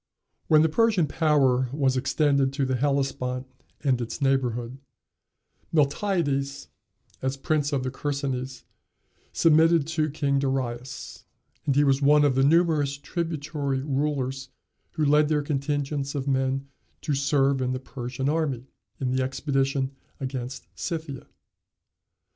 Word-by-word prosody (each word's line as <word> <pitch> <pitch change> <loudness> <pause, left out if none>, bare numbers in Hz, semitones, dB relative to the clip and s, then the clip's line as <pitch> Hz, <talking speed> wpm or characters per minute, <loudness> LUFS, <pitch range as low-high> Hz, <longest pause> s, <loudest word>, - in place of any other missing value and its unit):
When 155 -1 +6
the - - +4
Persian 210 +1 +3
power 135 -5 +2
was 135 -2 +1
extended 140 0 +2
to 135 -1 0
the 130 0 0
Hellespont 135 -1 -1 0.4
and 130 -4 +2
its 115 - -5
neighborhood, 130 -2 0 0.9
Miltiades, 145 -3 0 0.5
as 130 +1 -1
prince 145 +1 0
of 135 -3 0
the 130 - -2
Chersonese, 135 -2 -3 0.7
submitted 165 -1 +4
to 155 -1 0
King 140 -1 0
Darius; 130 -2 -3 0.4
and 140 - +2
he 145 - +5
was 135 -1 +3
one 145 +1 +5
of 140 - +3
the 135 - +2
numerous 150 -2 +3
tributary 145 -3 -3
rulers 135 -2 -2 0.4
who 155 - 0
led 150 +1 +4
their 150 -2 +1
contingents 140 0 -2
of 140 -1 -3
men 135 0 0 0.3
to 150 - -1
serve 140 -1 +2
in 125 0 0
the 130 - -2
Persian 130 0 -5
army, 145 -5 0 0.3
in 130 -2 -1
the 130 - +1
expedition 135 0 0 0.3
against 130 -1 -5
Scythia. 160 -6 -5
140 Hz, 130 wpm, -26 LUFS, 130-150 Hz, 0.9 s, When